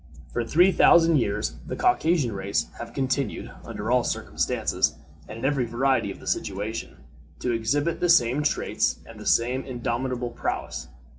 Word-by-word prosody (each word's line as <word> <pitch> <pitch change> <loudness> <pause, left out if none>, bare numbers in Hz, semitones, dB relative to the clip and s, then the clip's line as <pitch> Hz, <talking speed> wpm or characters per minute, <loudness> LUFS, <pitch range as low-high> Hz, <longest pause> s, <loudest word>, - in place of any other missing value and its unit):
For 120 - 0
three 175 +10 +4
thousand 165 -3 +6
years - - -1
the - - -3
Caucasian 170 - +2
race 100 0 -1
have 120 0 -7
continued, 135 +1 -2
under 110 +3 -4
all 125 -1 +4
circumstances, - - 0 0.3
and 105 - -8
in 115 - -4
every 135 -3 +1
variety 130 +3 +1
of - - -9
situation, 105 +4 -3 0.4
to 125 - -2
exhibit 140 +8 0
the 175 - +1
same 140 -4 +4
traits 150 - 0
and - - -12
the - - -7
same 125 +3 +2
indomitable 125 0 -3
prowess. - - -4
125 Hz, 150 wpm, -25 LUFS, 115-145 Hz, 0.4 s, thousand